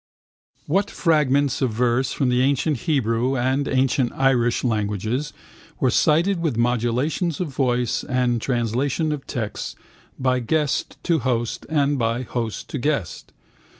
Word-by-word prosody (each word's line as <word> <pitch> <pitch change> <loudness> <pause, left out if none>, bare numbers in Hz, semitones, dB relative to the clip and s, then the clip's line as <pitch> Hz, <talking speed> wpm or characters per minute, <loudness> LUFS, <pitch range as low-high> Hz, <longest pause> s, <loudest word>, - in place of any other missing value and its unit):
What 195 +7 +1
fragments 145 - +2
of 130 - +2
verse 125 +3 +1
from 135 -3 0
the 125 0 +2
ancient 140 +3 +2
Hebrew 125 -2 +1
and 130 +3 0
ancient 130 -1 +1
Irish 125 -3 +2
languages 110 +4 -1 0.5
were 130 - +2
cited 170 - +3
with 155 -9 -1
modulations 125 +7 0
of 180 - -2
voice 125 -3 0
and 125 -3 0
translation 130 +6 0
of 145 -3 -5
texts 110 -4 -4 0.4
by 130 -1 +1
guest 150 +4 -1
to 165 -3 +2
host 120 -2 -2
and 145 -3 +1
by 115 +2 0
host 115 -4 -4
to 145 - -4
guest? 140 - -2
130 Hz, 135 wpm, -22 LUFS, 120-145 Hz, 0.5 s, cited